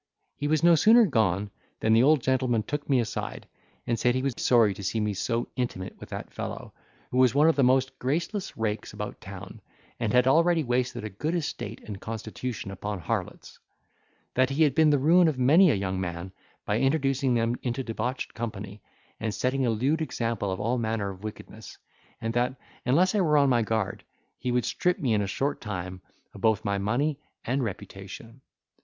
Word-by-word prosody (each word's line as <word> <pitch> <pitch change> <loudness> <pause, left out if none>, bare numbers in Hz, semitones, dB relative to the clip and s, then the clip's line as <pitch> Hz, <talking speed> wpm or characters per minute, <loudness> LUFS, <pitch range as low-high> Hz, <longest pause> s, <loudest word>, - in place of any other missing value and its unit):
He 145 - -3
was 155 0 +1
no 170 0 +7
sooner 220 +8 +6
gone 105 - +1 0.3
than 110 - +2
the 115 - +6
old 145 +2 +5
gentleman 130 -4 +1
took 145 +4 -4
me 135 -2 +4
aside, 115 -2 -4 0.4
and 115 -1 -1
said, 125 +2 +2
he 130 - -1
was 135 -2 0
sorry 115 -6 +4
to 100 +1 -9
see 100 +4 -1
me 105 -1 0
so 115 +4 -1
intimate 120 -7 -4
with - - -10
that - - -7
fellow, - - -6 0.4
who 125 - +1
was 130 0 +4
one 150 +2 +5
of 165 - +4
the 140 - +2
most 130 +1 +2
graceless 170 - -2
rakes 110 -1 -2
about - - -6
town, - - -9 0.4
and 115 -3 0
had 125 +1 +4
already 165 +4 +4
wasted 120 -2 -1
a 110 - -4
good 150 - -2
estate 130 -9 -4
and 100 -3 -7
constitution 110 -1 -5
upon 100 +2 -4
harlots; 85 - -4 0.7
that 130 0 +3
he 140 +4 +2
had 145 -4 +3
been 155 +2 +5
the 145 - +4
ruin 165 +6 +5
of 155 -4 0
many 155 +9 +6
a - - +3
young 95 -1 -2
man, 85 +1 -5 0.3
by 105 +2 0
introducing 135 -2 +1
them 115 +1 +1
into 125 +1 -2
debauched 120 +2 -3
company, 105 -3 -6 0.4
and 110 -2 -2
setting 130 +3 0
a - - +2
lewd 135 +9 +1
example 115 -9 -2
of 95 - -3
all 120 +3 0
manner 110 -3 -1
of 95 +1 -12
wickedness; 110 -1 -9 0.4
and 115 0 -3
that, 125 +2 +1 0.3
unless 175 +10 +4
I 210 - +2
were 155 -4 +3
on 140 -1 +4
my 120 -2 +3
guard, 110 -3 -2 0.4
he 125 - -2
would 125 0 +1
strip 180 0 0
me 125 -6 0
in 105 - +2
a 100 - -1
short 135 +9 -2
time 95 -3 -5 0.3
both 110 +2 +2
of - - -23
my 100 -1 0
money 135 +9 0 0.3
and 130 +3 0
reputation. 110 +3 -8
120 Hz, 200 wpm, -27 LUFS, 105-140 Hz, 0.7 s, no